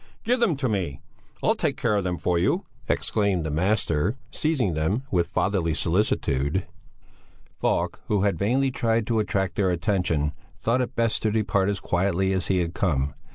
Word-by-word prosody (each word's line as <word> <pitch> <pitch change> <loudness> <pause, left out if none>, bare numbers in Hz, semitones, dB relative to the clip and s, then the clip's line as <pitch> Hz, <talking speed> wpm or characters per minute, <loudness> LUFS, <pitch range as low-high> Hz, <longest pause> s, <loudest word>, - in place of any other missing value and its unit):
"Give 245 +3 +2
them 230 -10 +3
to 135 -1 -1
me, 95 - -2 0.4
I'll - - +4
take - - -1
care 105 - +1
of 100 - +1
them 90 -1 -1
for 85 +2 +1
you," 85 - +1 0.2
exclaimed 100 -6 +1
the 80 - -2
master, 90 - +1 0.2
seizing 135 - +1
them 80 +11 0
with 85 -3 +1
fatherly 85 -3 0
solicitude. 85 -3 +1 0.9
Falk, - - 0
who 105 -2 +1
had 100 -3 +2
vainly 130 +9 +1
tried 115 -2 +1
to 115 -1 +1
attract 95 -3 0
their 95 -2 +2
attention, 85 -4 0 0.3
thought 120 +3 +1
it 125 - -3
best 115 -1 +1
to 110 - +1
depart 100 -2 +1
as 100 -2 -1
quietly 95 +2 +1
as 95 -2 0
he 95 - +2
had 85 -1 -1
come. 70 -7 0
95 Hz, 175 wpm, -25 LUFS, 85-110 Hz, 0.9 s, I'll